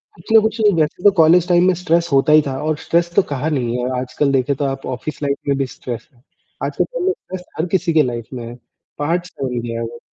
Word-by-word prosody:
कुछ 170 +6 -11
ना 220 - +9
कुछ 220 +1 -1 0.2
वैसे 155 +4 -1
तो 205 - +7
कॉलेज 165 +2 +5
टाइम 175 0 +5
में 185 - +4
स्ट्रेस 170 -1 +1
होता 145 +3 +4
ही 155 - +7
था 135 -1 -3
और 155 -1 0
स्ट्रेस 170 +2 0
तो - - +6
कहा 140 +3 -1
नहीं 125 -5 -1
है, 125 +1 -2
आजकल 135 +2 -1
देखें 135 +1 +1
तो 140 - -2
आप 135 0 -3
ऑफिस 130 +4 -5
लाइफ 140 0 0
में 140 - +2
भी 135 - 0
स्ट्रेस 120 -2 -7
है, 120 - -27 0.4
आजकल - - 0
तो - - -3
लो 380 - +3
स्ट्रेस 185 -1 -9 0.2
हर 165 - +1
किसी 175 -3 +1
के 155 - +5
लाइफ़ 120 -3 -4
में 120 -1 -6
है, 120 - -8 0.4
पार्ट्स 175 +4 -1
बन 125 -2 -2
गया 115 -1 -4
वो, 120 +1 -7
145 Hz, 250 wpm, -19 LUFS, 125-170 Hz, 0.4 s, ना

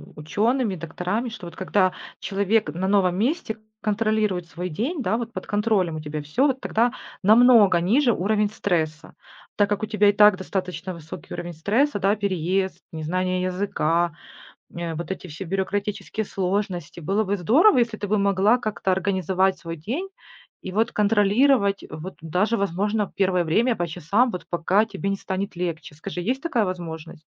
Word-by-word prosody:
учеными, 215 - 0
докторами, 180 +8 -3
что 215 -6 -9
вот - - -11
когда 185 0 +1 0.3
человек 200 -1 +1
на 185 +3 -2
новом 195 -3 +3
месте 225 - -1 0.2
контролирует 210 -4 0
свой 180 +1 -5
день, 260 - -2
да, 220 -1 0
вот 235 -1 -5
под - - -6
контролем 205 -5 +1
у 155 - -4
тебя 150 0 -5
всё, 200 - +1
вот 265 -1 -1
тогда 235 +2 +1 0.3
намного 220 -4 +6
ниже 240 +8 +3
уровень 210 +2 +1
стресса. 160 -7 -2 0.4
Так 205 -1 +3
как 205 +1 -1
у - - +2
тебя 210 -1 +3
и - - +6
так 210 -2 +6
достаточно 185 -1 -4
высокий 160 -2 -9
уровень 175 0 -5
стресса, 205 - +1
да, 195 +2 +2
переезд, 190 -1 -1
незнание 180 +3 -1
языка,- 175 -3 0 0.6
э, 170 -1 -4
вот 170 +3 -6
эти 190 - -5
все 165 +5 -7
бюрократические 200 +3 -2
сложности. 185 -4 -3
Было 195 +7 0
бы 200 +1 0
здорово, 260 - +5
если 235 -2 +1
ты 205 - -3
бы 215 - +2
могла 200 +3 +3
как-то 205 -4 -1
организовать 190 0 +1
свой 165 -1 -6
день 260 - -4 0.5
и 185 - -6
вот 220 +3 +1
контролировать, 210 +1 +3
вот 155 +5 -7
даже, 185 +8 +1
возможно, 200 +2 -1
первое 185 -2 +2
время 225 +9 +2
по 175 -1 -1
часам, 180 - +1
вот 180 - -6
пока 180 +5 +2
тебе 195 -2 -4
не 195 - 0
станет 195 0 -4
легче. 170 -4 -4
Скажи, 180 +4 -6
есть 250 +9 -1
такая 250 -10 +1
возможность? 165 -4 -6
195 Hz, 165 wpm, -24 LUFS, 175-215 Hz, 0.6 s, намного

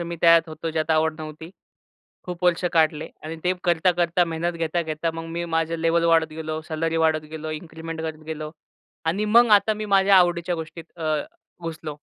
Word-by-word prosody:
मी 170 0 -4
त्यात 165 -1 +7
होतो, 160 +1 -5
ज्यात 160 0 -1
आवड 155 0 +1
नव्हती. 155 +1 -8 0.7
खूप 180 0 -6
वर्ष 180 0 +2
काढले 155 -2 +2 0.2
आणि 160 +1 -5
ते 180 - +3
करता, 175 +1 +3
करता, 175 0 +2
मेहनत 165 +1 -2
घेता, 165 +1 0
घेता, 160 +1 -2
मग 165 0 -5
मी 170 - -2
माझं 165 +1 0
लेव्हल 165 +1 +2
वाढत 165 -1 +4
गेलो, 155 0 -4
सॅलरी 165 +1 -1
वाढत 160 -1 +2
गेलो, 155 0 -5
इन्क्रिमेंट 160 +1 -7
करत 160 -1 -5
गेलो 155 -1 -5 0.6
आणि 195 +6 +1
मग 240 0 +7
आता 205 +2 +4
मी 215 0 -5
माझ्या 195 0 +5
आवडीच्या 175 -1 +3
गोष्टीत 165 0 -7
अ, 155 -1 0 0.5
घुसलो. 160 -2 -6
165 Hz, 185 wpm, -24 LUFS, 160-170 Hz, 0.7 s, त्यात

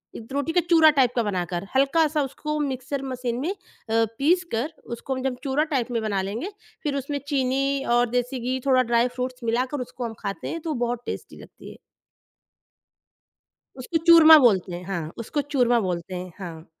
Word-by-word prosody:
इत 230 +3 -10
रोटी 285 +3 -1
का 355 - +4
चूरा 320 -2 +7
टाइप 250 -2 +4
का 235 - +2
बनाकर, 180 -2 -3
हल्का-सा 300 +3 +3
उसको 300 +3 -4
मिक्सर 270 0 -3
मशीन 250 -2 -3
में 315 +7 -2
अ, - - -5 0.6
पीसकर 315 -3 0
उसको 235 +3 -4
हम 260 - -5
जब 260 -2 -1
चूरा 280 +2 +1
टाइप 250 -2 0
में 230 -2 -1
बना 200 -3 -1
लेंगे, 220 - -4 0.3
फिर 290 -3 -1
उसमें 280 +1 -3
चीनी 275 0 0
और 240 -1 +3
देसी 250 +2 -1
घी 255 +2 -2
थोड़ा 260 -2 +4
ड्राइ 235 0 +2
फ्रूट्स 255 -1 -4
मिलाकर 250 +4 -1
उसको 245 0 -6
हम 230 - -5
खाते 195 - -5
हैं 330 - -4
तो 325 - -5
वो 305 - -1
बहुत 240 0 -3
टेस्टी - - -6
लगती - - -13
है। - - -14 2.0
उसको 325 +6 -1
चूरमा 320 -2 +10
बोलते 200 -8 +3
हैं 175 - -7
हाँ, 170 -5 -4
उसको 235 +6 -2
चूरमा 250 -4 +2
बोलते 180 -1 -3
हैं, 180 0 -6
हाँ। 165 -4 -8
255 Hz, 185 wpm, -24 LUFS, 230-285 Hz, 2.0 s, चूरमा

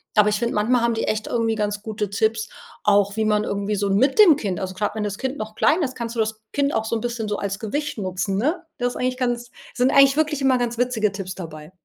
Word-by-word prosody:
Aber 210 0 +5
ich 210 - +1
finde, 235 0 -1
manchmal 235 +4 +2
haben 235 0 +2
die 225 - -1
echt 215 0 -1
irgendwie 230 -2 0
ganz 210 -1 -2
gute 215 -2 -3
Tipps, 220 +2 0 0.3
auch 200 0 +3
wie 220 - +1
man 210 0 +2
irgendwie 200 +1 -2
so 200 0 -1
mit 260 - +2
dem 370 -8 +9
Kind 200 - -3
also 190 -1 -4
grad 210 +2 -1
wenn 215 - -2
das 200 -1 -3
Kind 265 +2 -3
noch 215 0 -6
klein 325 +4 +3
ist, 260 -2 -3
kannst 235 0 -5
du - - -3
das 220 0 -1
Kind 285 0 +1
auch 220 0 0
so 225 - -1
'n 225 - -2
bisschen 235 -2 -3
so 210 - -1
als 195 -1 -3
Gewicht 290 +7 -3
nutzen, 195 0 -2
ne? 315 - 0
Das 245 0 0
ist - - -8
eigentlich 255 0 -1
ganz 240 -1 -2 0.2
sind 255 +2 +2
eigentlich 275 0 +6
wirklich 305 -2 +1
immer 265 -1 +4
ganz 240 -1 -2
witzige 235 -4 +1
Tipps 195 -2 -5
dabei. 155 -2 -9
220 Hz, 265 wpm, -22 LUFS, 205-250 Hz, 0.3 s, dem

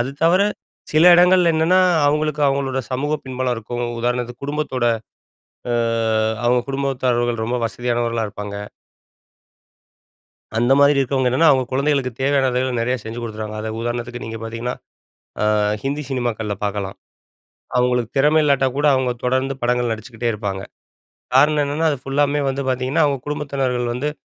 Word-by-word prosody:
அது 125 +3 -1
தவர 180 +4 +5 0.5
சில 155 +2 +5
இடங்கள்ல 180 0 +5
என்னன்னா, 170 +4 +3 0.3
அவங்களுக்கு, 150 0 0
அவங்களோட 135 -1 -1
சமூகப் 145 +3 -2
பின்பலம் 130 -1 -1
இருக்கும். 120 +2 -4 0.2
உதாரணத்துக்கு 120 +1 -2
குடும்பத்தோட, 145 -4 -2 0.9
அ - - +1 0.7
அவங்க 125 +1 +4
குடும்பத்தாரர்கள் 125 -4 0
ரொம்ப 120 +2 -1
வசதியானவர்களா 120 -1 -1
இருப்பாங்க. 105 0 -7 2.0
அந்த 120 +3 +2
மாரி 145 +1 +6
இருக்குறவங்க 135 -1 +1
என்னன்னா, 155 +6 +4
அவங்க 130 -1 +2
குழந்தைகளுக்கு 135 -1 +1
தேவையானதுகள 130 -2 +1
நெறையா 125 +2 0
செஞ்சு 115 +2 -6
கொடுத்துறாங்க. 110 -1 -5
அதாவது 110 - -4
உதாரணத்துக்கு 120 +1 -4
நீங்க 115 0 -6
பாத்தீங்கன்னா, 115 +2 -4 0.7
அ, - - +2 0.4
ஹிந்தி 140 +2 -2
சினிமாக்கள்ல 115 -5 -2
பாக்கலாம். 100 -1 -3 0.8
அவங்களுக்கு 125 -2 +1
திறமை 150 +3 +4
இல்லாட்டா 140 -2 +3
கூட, 145 - +1
அவங்க 130 -1 0
தொடர்ந்து 130 +2 0
படங்கள் 120 -1 +1
நடிச்சுக்கிட்டே 115 +1 -4
இருப்பாங்க. 100 -2 -4 0.8
காரணம் 150 +2 +4
என்னன்னா, 150 +3 0
அது 140 - -2
ஃபுல்லாமே 145 +1 +1
வந்து 135 +1 -2
பாத்தீங்கன்னா, 130 +5 +1
அவங்க 140 -2 -1
குடும்பத்தினர்கள் 135 -4 -2
வந்து, 145 +5 -2
130 Hz, 135 wpm, -20 LUFS, 120-140 Hz, 2.0 s, மாரி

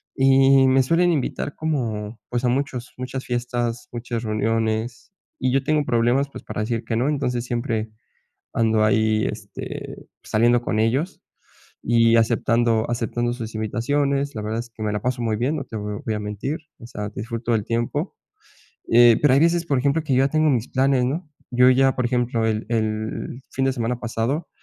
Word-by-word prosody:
Y 135 0 +5
me 130 0 +4
suelen 170 +6 +3
invitar 145 -1 -2
como, 115 -8 -3
pues, 125 +1 -1
a - - +3
muchos 130 -1 -2
muchas 130 +1 -5
fiestas, 120 -1 -2
muchas 120 -1 -4
reuniones, 110 - -1 0.3
y 130 -1 +1
yo 135 +1 +1
tengo 150 0 +1
problemas, 125 +3 +2
pues, - - -10
para - - -4
decir 115 +1 -2
que 115 - -2
no. 130 +5 +1
Entonces, 125 -4 -1
siempre, 115 -3 -2 0.6
ando 110 -1 +2
ahí, 110 0 +2
este, 105 -2 -7
saliendo 120 +2 +3
con 110 -2 0
ellos 135 +12 0 0.6
y 115 0 +4
aceptando 115 0 +2
aceptando 120 0 -1
sus 115 -2 -6
invitaciones. 140 +6 0
La 105 - -4
verdad 110 +1 -3
es 120 0 -9
que 110 - -10
me 105 -1 -1
la 105 - -2
paso 125 -1 -1
muy 110 -2 0
bien, 130 +8 0
no 135 - -4
te 110 - -8
vo 105 0 -5
voy 110 - -1
a 105 - -3
mentir, 105 +9 -4 0.2
o 115 - -9
sea, 105 -3 -5
disfruto 115 +2 -4
del 110 -3 +1
tiempo, 115 +1 -2 0.8
eh, 120 -1 +7
pero 145 -3 +5
hay 140 - +4
veces, 170 +1 +2
por 140 -5 +1
ejemplo, 140 +5 +1
que 140 - 0
yo 130 +1 +4
ya - - +2
tengo 155 +1 +3
mis 120 -3 0
planes, 130 -1 +2
¿no? 150 +6 -3 0.2
Yo 125 +1 +5
ya 135 +1 +3
por 125 - 0
ejemplo, 120 -2 0
el 110 0 -1
el 110 +2 -2
fin 135 - -1
de 135 - +2
semana 120 -1 -2
pasado 120 +7 -2
120 Hz, 190 wpm, -23 LUFS, 110-135 Hz, 0.8 s, eh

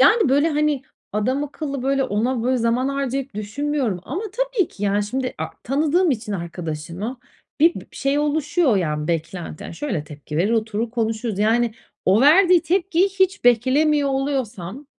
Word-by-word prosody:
Yani, 310 - +5
böyle, 285 +4 +3
hani, 300 -2 +1 0.3
adamakıllı, 275 +5 -2
böyle, 270 0 +1
ona, 235 +2 0
böyle, 255 +1 +2
zaman 235 +3 +1
harcayıp 275 -3 -2
düşünmüyorum 230 -1 -2
ama 350 +11 -4
tabii - - 0
ki, 205 - -12
yani, 205 0 +2
şimdi, 255 +4 -3
a - - -2 0.2
tanıdığım 310 +6 +2
için 220 -4 -2
arkadaşımı 170 +5 -5 0.4
bi 335 +2 +6
bir - - -8
şey 275 +1 +1
oluşuyor, 300 - +2
yani, 150 -4 -1
beklenti, 165 0 -3
yani, - - -7
şöyle 175 - -3
tepki 150 0 -8
verir, 185 +6 +2
oturur 220 0 -1
konuşuruz. 225 -2 -2
Yani, 225 +2 +2 0.3
o 195 +4 +4
verdiği 350 +5 +6
tepkiyi 365 +1 +2
hiç 380 +1 0
beklemiyor 280 +5 +3
oluyorsam 265 -4 -3
260 Hz, 150 wpm, -22 LUFS, 210-295 Hz, 0.4 s, bi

